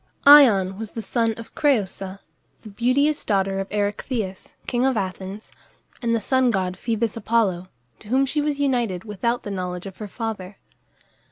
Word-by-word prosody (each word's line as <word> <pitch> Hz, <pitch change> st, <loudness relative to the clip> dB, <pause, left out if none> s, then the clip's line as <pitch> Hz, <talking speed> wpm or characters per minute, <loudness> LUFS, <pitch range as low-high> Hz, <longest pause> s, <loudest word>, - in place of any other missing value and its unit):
Ion 215 Hz, -10 st, +7 dB
was 225 Hz, -1 st, -6 dB
the 225 Hz, -, -5 dB
son 230 Hz, +1 st, 0 dB
of 230 Hz, -, -10 dB
Crëusa 200 Hz, -8 st, 0 dB, 0.5 s
(the 215 Hz, -, -9 dB
beauteous 255 Hz, +8 st, +1 dB
daughter 195 Hz, -2 st, 0 dB
of 195 Hz, -, -4 dB
Erechtheus, 205 Hz, -1 st, -3 dB
king 245 Hz, 0 st, 0 dB
of 265 Hz, -3 st, +2 dB
Athens) 190 Hz, +1 st, -5 dB, 0.5 s
and 230 Hz, -2 st, +1 dB
the -, -, +1 dB
sun 260 Hz, +3 st, +2 dB
god 185 Hz, -4 st, -1 dB
Phoebus 225 Hz, +1 st, -2 dB
Apollo, 215 Hz, -6 st, 0 dB, 0.3 s
to -, -, -15 dB
whom 260 Hz, +4 st, +2 dB
she 295 Hz, +3 st, -1 dB
was 290 Hz, -1 st, -1 dB
united 240 Hz, -10 st, 0 dB
without 225 Hz, +3 st, -2 dB
the 205 Hz, -, -5 dB
knowledge 180 Hz, -1 st, -4 dB
of 195 Hz, -1 st, -9 dB
her 210 Hz, -, -6 dB
father. 205 Hz, -3 st, -5 dB
220 Hz, 165 wpm, -23 LUFS, 195-245 Hz, 0.5 s, Ion